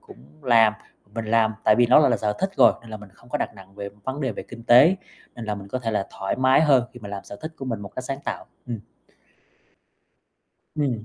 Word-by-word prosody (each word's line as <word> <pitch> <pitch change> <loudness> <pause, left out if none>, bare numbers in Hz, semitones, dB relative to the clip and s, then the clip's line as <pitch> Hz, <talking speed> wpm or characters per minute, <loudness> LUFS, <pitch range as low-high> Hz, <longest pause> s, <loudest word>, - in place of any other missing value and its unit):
cũng - - -15 0.2
làm, 115 -3 +5 0.4
mình 115 - -3
làm, 110 0 +3
tại 105 - +6
vì 120 - +5
nó 125 +5 +7
gọi 150 - +4
là - - +3
sở 105 -1 -1
thích 190 +1 0
rồi, - - +7
nên 115 -1 -14
là 110 - -5
mình 105 -1 -13
không 120 - -21
có 150 - -2
đặt - - -3
nặng 95 -1 -15
về 100 0 -6 0.2
vấn 130 +3 -4
đề 130 -4 -1
về - - -6
kinh 115 -1 -12
tế, 140 +11 +7 0.4
nên 120 - -6
là 105 -1 -2
mình 100 -1 -9
có 130 - -2
thể 115 -2 -3
là 105 -3 -1
thoải 95 - -2
mái 130 +3 +4
hơn 135 -6 +4
khi 125 - -12
mà 105 - -8
làm 100 -1 -6
sở 100 - -9
thích 160 +1 -6
của 135 - -7
mình 115 -5 -3
một 100 - -7
cách 130 - -5
sáng 135 +1 -4
tạo, - - -4 0.2
ừm. 120 -3 -4 2.0
Ừm. 130 -7 -1
115 Hz, 255 wpm, -24 LUFS, 105-130 Hz, 2.0 s, nó